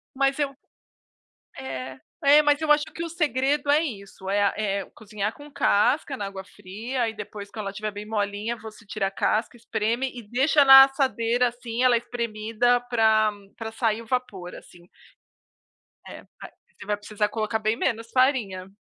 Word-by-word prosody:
Mas 275 +1 +1
eu 275 -2 -1 1.0
é 130 0 -6 0.3
é, 295 +2 +7
mas 295 0 +2
eu 310 -1 +4
acho 295 0 +2
que 335 - -6
o 335 - -4
segredo 285 -2 0
é 295 +2 +5
isso, 200 -9 -7
eh, 205 +1 +2
a 200 - +3
eh, 200 -2 -1
cozinhar 210 -1 -4
com 290 +4 -13
casca, 265 +7 +2
na 205 - -4
água 195 -1 -7
fria, 210 +7 -6
aí 225 -1 -1
depois, 205 -1 -8
quando 215 -1 -7
ela 195 - -3
tiver 215 +1 -4
bem 205 +1 -7
molinha, 210 +2 -2
você 220 0 -12
tira 195 -1 -2
a - - -2
casca, 220 +4 -1
espreme 235 +2 -2
e 245 - -8
deixa 280 +4 +3
na 270 0 +11
assadeira, 250 -3 +1
assim, 240 0 -3
ela 245 -2 +5
espremida 235 0 0
pra 220 -2 +4 0.3
pra 225 -1 -6
sair 225 0 -1
o - - -15
vapor, 215 -8 -3
assim. 175 0 -16 1.2
É, - - -10 0.5
você - - -11
vai 210 0 -1
precisar 210 0 -2
colocar 220 0 -2
bem 215 +1 0
menos 230 -2 -2
farinha. 230 -9 +1
225 Hz, 170 wpm, -25 LUFS, 205-260 Hz, 1.2 s, na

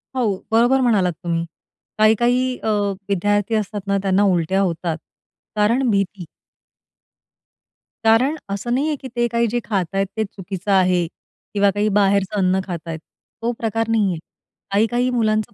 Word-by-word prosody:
हो, 220 -7 +1
बरोबर 240 +4 +4
म्हणालात 205 -8 +2
तुम्ही. 170 -1 -1 0.5
काही-काही 245 +4 +3
अ, - - 0 0.4
विद्यार्थी 205 +3 +1
असतात 210 -1 -2
ना 200 - +2
त्यांना 195 +1 +2
उलट्या 190 0 +2
होतात. 170 -3 -1 0.6
कारण 230 +5 +2
भीती. 195 -3 -1 1.8
कारण 240 +7 +4
असं 200 +5 -2
नाही 280 +4 +1
आहे, 305 - 0
की 270 -1 -9
ते 240 0 +2
काही 235 0 +1
जे 240 +2 -1
खात 195 -5 0
आहेत, 195 0 +1
ते 220 - +2
चुकीचं 195 0 -5
आहे 185 -2 +3 0.5
किंवा 200 -1 +3
काही 205 +2 0
बाहेरचं 200 0 +2
अन्न 185 0 +2
खात 175 -3 -4
आहेत. 160 -1 -4 0.4
तो 235 +1 0
प्रकार 225 0 -1
नाही 220 -3 +2
आहे. 165 - -4 0.5
काही-काही 240 +5 +2
मुलांचं 215 -4 0
205 Hz, 150 wpm, -21 LUFS, 190-230 Hz, 1.8 s, बरोबर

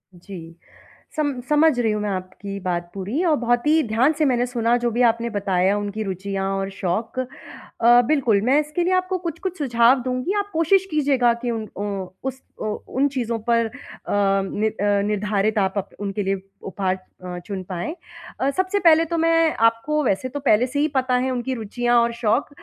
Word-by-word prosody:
जी। 170 -2 -10 0.6
सम 290 -4 0
समझ 300 -3 +4
रही 225 -2 +2
हूँ 210 - -1
मैं 210 - -2
आपकी 195 +1 -5
बात 175 -1 -2
पूरी 205 - -2
और 315 -3 +4
बहुत 240 +1 0
ही 315 +1 +5
ध्यान 240 +8 +3
से 305 - +3
मैंने 245 -3 +2
सुना, 240 -1 +1
जो 240 -1 -1
भी 240 - 0
आपने 235 +1 0
बताया, 195 -2 +1
उनकी 205 +1 -3
रुचियाँ 195 0 -3
और 195 0 -2
शौक। 195 +6 -3
अ, 245 -2 +1
बिल्कुल, 250 -9 +2
मैं 260 +6 +3
इसके 305 +3 -1
लिए 370 +2 +1
आपको 370 0 +1
कुछ-कुछ 355 +2 -5
सुझाव 250 -2 +3
दूँगी, 255 +8 -1
आप 405 0 -3
कोशिश 365 +4 +3
कीजिएगा 270 -5 +3
कि 240 - 0
उन 220 -2 -4
ओ 200 - -3 0.4
उस 265 0 -4 0.2
उ - - -4 0.2
उन 275 +2 +1
चीज़ों 240 -4 -2
पर 230 0 +3
अ, - - -12 0.4
नि 195 +1 +1
अ, 205 -1 0
निर्धारित 210 +1 0
आप 190 -1 +1
अप 195 - -2
उनके 200 0 -3
लिए 195 0 -1 0.2
उपहार 190 -1 -1 0.3
अ, 180 -1 -6
चुन 195 -3 -5
पाएँ। 180 - -4 0.4
अ, 270 - +1
सबसे 375 +5 0
पहले 330 -2 +5
तो 335 +1 -2
मैं 330 -1 +3
आपको 300 +7 -2
वैसे 255 +2 0
तो 285 - -5
पहले 250 -3 +3
से 285 +3 -3
ही 305 - +3
पता 255 -1 +2
है 255 +1 +1
उनकी 255 +1 -2
रुचियाँ 240 +1 0
और 235 0 +1
शौक, 235 +4 0
235 Hz, 195 wpm, -22 LUFS, 200-285 Hz, 0.6 s, ही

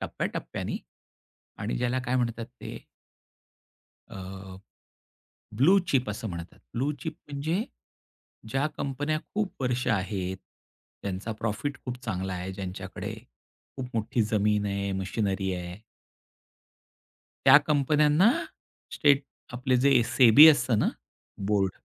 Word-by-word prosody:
टप्प्याटप्प्याने - - -4 0.8
आणि 105 +2 -2
ज्याला 125 +1 0
काय 125 +1 0
म्हणतात 115 -2 -1
ते? - - -7 1.3
अ, 95 -1 -9 1.0
ब्लू 170 - +5
चिप 125 -6 +1
असं 110 +1 -5
म्हणतात. 85 -1 -7 0.2
ब्लू 135 +5 0
चिप 160 -1 -4
म्हणजे 160 +9 -1 0.9
ज्या 135 +4 +1
कंपन्या 145 +3 -1 0.2
खूप 210 -2 -1
वर्ष 125 0 0
आहेत. 95 -3 -1 0.7
त्यांचा 100 +3 -3
प्रॉफिट 115 +6 -3
खूप 125 -1 -5
चांगला 95 +1 -3
आहे, 90 +2 -5
ज्यांच्याकडे 95 0 -6 0.6
खूप 130 -2 -5
मोठी 115 +1 0
जमीन 105 -1 +1
आहे, 100 0 -2
मशिनरी 95 0 -1
आहे. 90 +3 -7 1.7
त्या 135 +1 +10
कंपन्यांना 150 - +4 0.6
स्टेट 145 -1 +4 0.3
आपले 125 +1 +1
जे 135 -4 +6
सेबी 130 +6 +8
असतं 125 -6 +4
ना, - - +2 0.5
बोर्ड. 100 -1 +1
115 Hz, 110 wpm, -27 LUFS, 95-140 Hz, 1.7 s, त्या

